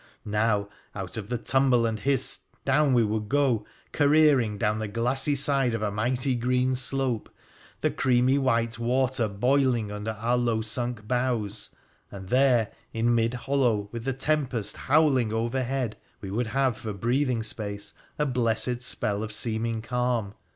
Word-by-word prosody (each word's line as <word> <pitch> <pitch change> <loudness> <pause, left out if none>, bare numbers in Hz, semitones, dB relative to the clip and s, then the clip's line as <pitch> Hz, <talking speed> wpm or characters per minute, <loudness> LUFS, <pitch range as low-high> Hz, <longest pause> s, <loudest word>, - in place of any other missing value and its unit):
Now, 105 -1 0 0.3
out 95 -2 -6
of 110 -1 -6
the 120 - -1
tumble 130 -1 +2
and 110 -1 -2
hiss, 135 0 +1 0.2
down 150 -3 +3
we 120 -2 +4
would 105 0 -2
go, 135 -7 +1 0.2
careering 145 -7 +3
down 105 +1 0
the 110 - -3
glassy 125 +7 0
side 135 -3 +3
of 110 - -3
a 105 - -1
mighty 125 +5 0
green 125 +1 +1
slope, 130 -3 -1 0.5
the - - +1
creamy 130 +1 +2
white 115 -3 0
water 125 0 +1
boiling 120 +1 +1
under 105 +2 -4
our 115 +3 0
low 120 -2 0
sunk 115 -1 -3
bows, 120 -4 -1 0.4
and 95 -2 -10
there, 125 -4 +3 0.2
in 115 +1 +1
mid 115 +1 +1
hollow, 125 -6 0
with 115 -1 -6
the 135 +1 -1
tempest 135 -5 0
howl 150 -1 +3
ing 115 -3 -1
overhead, 120 +1 -2 0.2
we 95 - -7
would 115 +3 -1
have 130 -1 0
for 110 - -7
a - - -3
breathing 120 +3 0
space 105 -2 -2 0.2
a 150 - +1
blessed 120 -1 0
spell 105 -4 0
of 110 0 -5
seeming 110 0 0
calm. 125 -4 -1
120 Hz, 160 wpm, -26 LUFS, 110-130 Hz, 0.5 s, we